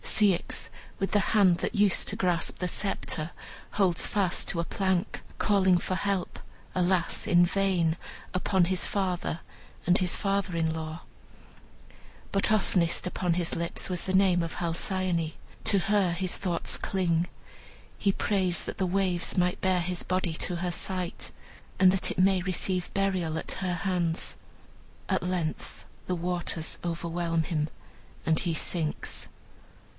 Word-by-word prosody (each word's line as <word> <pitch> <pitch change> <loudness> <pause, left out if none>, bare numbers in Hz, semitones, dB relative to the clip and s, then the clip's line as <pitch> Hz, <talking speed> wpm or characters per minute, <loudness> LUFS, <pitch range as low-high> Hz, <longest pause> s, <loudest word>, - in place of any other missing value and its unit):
Ceyx, 200 -5 +2 0.3
with 195 - -1
the 205 - +5
hand 190 -5 +5
that - - -2
used 205 -2 +4
to - - 0
grasp 175 -2 +1
the 180 - -1
sceptre, 170 -4 -2 0.4
holds 185 -5 +2
fast 195 -4 +1
to 170 - -1
a - - +1
plank, 190 0 -1 0.2
calling 190 -3 +4
for 185 - -2
help, 195 -1 -1 0.4
alas, 180 -1 +1
in 175 0 +6
vain, 175 -3 +1 0.4
upon 185 0 +2
his 185 +1 +1
father 180 -4 -1 0.5
and 180 +1 +5
his 180 -2 +1
father 195 -2 0
in 160 -1 +1
law. 160 +1 -5 1.3
But 195 +2 +1
oftenest 180 -5 +2 0.2
on 175 -2 +3
his 170 -1 -1
lips 170 +2 -3
was 180 -2 -2
the 190 - -2
name 190 -2 +4
of 165 - -4
Halcyone. 170 -1 -1 0.3
To 200 - +4
her 195 -1 +2
his 180 +1 0
thoughts 175 -4 -1
cling. 175 -3 0 0.7
He 200 - +2
prays 190 -3 0
that - - -5
the 190 - +1
waves 185 -1 0
may 180 0 +3
bear 185 -2 +1
his 180 0 -2
body 185 -2 0
to 175 +2 -1
her 175 +1 -1
sight, 180 0 -3 0.5
and 185 0 +7
that 190 -1 0
it - - -4
may 190 0 +4
receive 185 0 -1
burial 185 -5 0
at - - -3
her 180 -1 0
hands. 175 -2 -1 0.7
At 190 -3 +1
length 180 -3 -3 0.2
the 180 - 0
waters 175 -2 -2
overwhelm 170 -1 -1
him, 155 -3 -1 0.6
and 160 -1 +3
he 175 -3 0
sinks. 160 -1 -2
180 Hz, 150 wpm, -28 LUFS, 170-190 Hz, 1.3 s, and